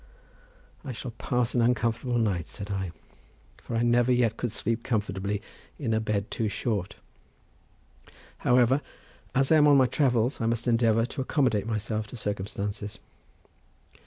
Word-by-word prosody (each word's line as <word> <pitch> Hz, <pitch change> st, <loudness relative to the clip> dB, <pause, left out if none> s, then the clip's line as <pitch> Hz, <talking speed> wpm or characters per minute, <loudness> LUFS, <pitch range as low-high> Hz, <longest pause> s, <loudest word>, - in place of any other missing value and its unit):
"I 130 Hz, -, -5 dB
shall 120 Hz, +2 st, -6 dB
pass 125 Hz, +1 st, -1 dB
an 120 Hz, -, +2 dB
uncomfortable 120 Hz, +1 st, +1 dB
night," 95 Hz, -7 st, 0 dB
said 100 Hz, 0 st, -6 dB
I, 95 Hz, -3 st, -3 dB, 0.7 s
"for -, -, -5 dB
I 115 Hz, -, +2 dB
never 120 Hz, +1 st, +3 dB
yet 120 Hz, -3 st, +2 dB
could 120 Hz, -1 st, -3 dB
sleep 115 Hz, +2 st, -1 dB
comfortably 105 Hz, -3 st, -2 dB, 0.3 s
in 120 Hz, -7 st, -1 dB
a 110 Hz, -, +2 dB
bed 105 Hz, -2 st, -2 dB
too 110 Hz, -2 st, -1 dB
short. 105 Hz, -2 st, -2 dB, 1.4 s
However, 125 Hz, +3 st, +4 dB, 0.5 s
as 135 Hz, +2 st, +2 dB
I 160 Hz, -, +7 dB
am 150 Hz, -1 st, +6 dB
on 145 Hz, -1 st, +7 dB
my 130 Hz, -, +6 dB
travels, 125 Hz, -2 st, +1 dB
I 115 Hz, -, +1 dB
must 115 Hz, +1 st, -1 dB
endeavour 115 Hz, -1 st, +3 dB
to 135 Hz, +2 st, -5 dB
accommodate 130 Hz, -7 st, +1 dB
myself 110 Hz, -1 st, -2 dB
to 125 Hz, -, -9 dB
circumstances." 100 Hz, 0 st, -4 dB
115 Hz, 150 wpm, -27 LUFS, 105-125 Hz, 1.4 s, I